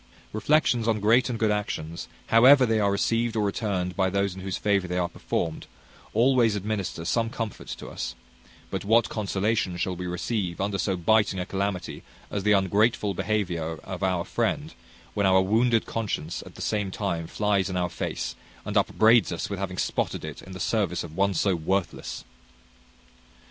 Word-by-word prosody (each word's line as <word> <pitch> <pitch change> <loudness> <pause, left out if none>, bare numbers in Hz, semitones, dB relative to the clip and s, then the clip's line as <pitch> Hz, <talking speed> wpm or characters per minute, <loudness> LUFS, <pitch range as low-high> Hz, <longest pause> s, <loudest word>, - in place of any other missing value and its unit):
Reflections 120 0 +2
on 110 -2 +2
great 115 +5 +4
and 120 - -2
good 110 -1 +2
actions, 85 -6 -3 0.2
however 130 +4 +7
they 110 -2 +1
are 100 -1 +2
received 115 +3 0
or 110 - +1
returned 95 -3 -1
by 95 0 +2
those 100 0 0
in 95 - -9
whose 95 0 -3
favour 100 -3 +1
they 90 0 -2
are 90 -1 +1
performed, 80 -2 -3 0.5
always 120 -2 +4
administer 100 -5 -3
some 115 +5 +1
comfort 115 -3 -5
to - - -7
us; 60 0 -5 0.6
but - - -3
what 115 +3 +3
consolation 100 -2 -1
shall 90 +1 -1
we 90 +1 -5
receive 90 0 -2
under 100 0 -1
so 95 -2 0
biting 105 +2 +3
a 90 - -2
calamity 100 -1 -3 0.3
as 100 - -1
the 105 +2 +2
ungrateful 100 +2 +2
behaviour 90 -5 -1
of - - -6
our 90 -2 0
friend, - - -1 0.4
when 100 -1 +2
our 95 0 +5
wounded 115 +3 +2
conscience 95 -7 -3
at - - -13
the - - -6
same 105 -2 -1
time 85 -4 -3
flies 100 +1 +1
in 95 - -2
our 90 -1 +1
face, - - -4 0.3
and - - -4
upbraids 110 -2 +4
us - - -4
with - - -3
having - - -4
spotted - - -1
it - - -7
in 95 - -11
the 90 - -7
service 95 -6 0
of 80 -2 -9
one 100 +1 +2
so 95 +3 +2
worthless! 85 +3 -2
100 Hz, 180 wpm, -26 LUFS, 90-110 Hz, 0.6 s, however